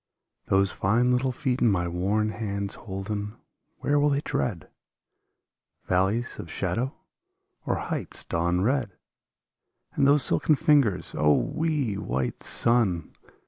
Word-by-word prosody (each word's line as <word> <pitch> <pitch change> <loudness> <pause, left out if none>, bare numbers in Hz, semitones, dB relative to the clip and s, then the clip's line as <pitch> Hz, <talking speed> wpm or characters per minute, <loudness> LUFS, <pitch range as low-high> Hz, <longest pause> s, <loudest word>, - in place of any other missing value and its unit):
Those 95 0 +2
fine 120 +6 +2
little 125 +1 +1
feet 125 0 -2
in 120 - +5
my 90 -4 +1
worn 100 +5 0
hands 100 -3 -3
holden.. 100 +1 -5 0.5
Where 145 0 +2
will 145 +1 +3
they 140 0 +1
tread? 125 - -2 1.2
Valleys 95 +6 0
of - - -7
shadow 130 +4 -2 0.7
or - - +1
heights - - -4
dawn 85 +2 0
red? 120 -1 0 1.0
And 140 - +3
those 145 0 +5
silken 155 - +3
fingers, 145 - +2
O, 75 0 +3
wee, 150 -9 -1
white 65 -6 -3
son. 110 -9 +1
110 Hz, 125 wpm, -26 LUFS, 95-135 Hz, 1.2 s, in